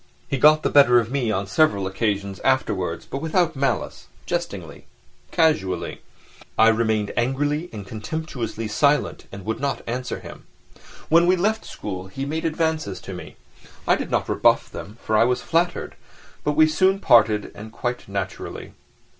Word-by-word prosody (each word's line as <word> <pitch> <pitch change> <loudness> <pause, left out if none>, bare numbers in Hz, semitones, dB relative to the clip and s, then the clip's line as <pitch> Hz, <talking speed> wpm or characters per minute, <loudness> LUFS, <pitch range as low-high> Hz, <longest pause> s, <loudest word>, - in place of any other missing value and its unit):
He 135 - -2
got 155 +3 +6
the - - +1
better 125 -4 +7
of 115 0 -3
me 130 -5 0
on 100 -1 -1
several 100 -3 +2
occasions 100 0 -2
afterwards, 100 -10 0
but 135 - -5
without 165 0 +1
malice, 140 +1 -2 0.2
jestingly, - - -4 0.4
casually. 130 - 0 0.6
I 110 +1 +7
remained 110 -2 +1
angrily 145 +7 0
and 105 -3 -7
contemptuously 115 0 -5
silent 140 +6 +1
and 100 -1 -9
would 110 +1 -2
not 140 -1 -2
answer 125 +1 -4
him. - - -12 0.6
When 170 +2 +5
we 185 - +5
left 215 +5 0
school 95 -2 -6
he 135 +9 -5
made 160 +3 -3
advances 160 - -1
to - - -8
me; - - -9 0.5
I - - +5
did - - -4
not - - 0
rebuff - - +2
them, 105 +4 -9
for 110 - 0
I 110 - +6
was 125 +1 0
flattered, 170 +1 0 0.5
but 150 - +1
we 155 +1 +6
soon 185 +5 +3
parted 110 - +4
and 110 +1 -10
quite 120 +1 -4
naturally. 100 -1 -5
125 Hz, 160 wpm, -23 LUFS, 105-155 Hz, 0.6 s, better